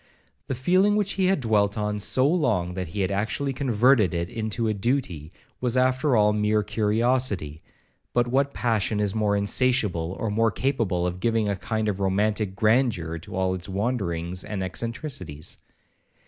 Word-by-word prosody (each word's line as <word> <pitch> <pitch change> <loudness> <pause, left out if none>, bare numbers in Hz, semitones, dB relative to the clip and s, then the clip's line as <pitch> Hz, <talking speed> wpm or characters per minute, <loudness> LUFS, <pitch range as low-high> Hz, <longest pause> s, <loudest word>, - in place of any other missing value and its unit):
The 130 - -2
feeling 185 +10 +3
which 205 -2 0
he 190 - 0
had 190 -6 +1
dwelt 105 -3 +1
on 105 0 -2
so 130 +6 +3
long, 115 - +1
that 90 -1 -4
he 100 +6 -4
had 95 - 0
actually 110 +7 -1
converted 120 - +3
it 85 +1 -2
into 110 0 -2
a 110 - +1
duty, 100 - -2 0.3
was 125 0 0
after 130 +2 +2
all 105 -1 +4
mere 105 0 +1
curiosity; 105 - 0 0.5
but 120 0 +1
what 135 +3 +1
passion 110 -2 0
is 100 -2 0
more 105 -2 +1
insatiable, 100 -5 +1
or 115 - -2
more 115 +2 +2
capable 110 -8 -1
of 90 0 -3
giving 115 0 +1
a 100 - 0
kind 110 +4 -2
of 100 -2 -1
romantic 100 +1 0
grandeur 110 -7 +1
to 85 - -10
all 95 0 0
its 90 +1 -6
wanderings 95 -5 -2
and 105 -3 -4
eccentricities? 95 - -4
105 Hz, 165 wpm, -25 LUFS, 95-125 Hz, 0.5 s, all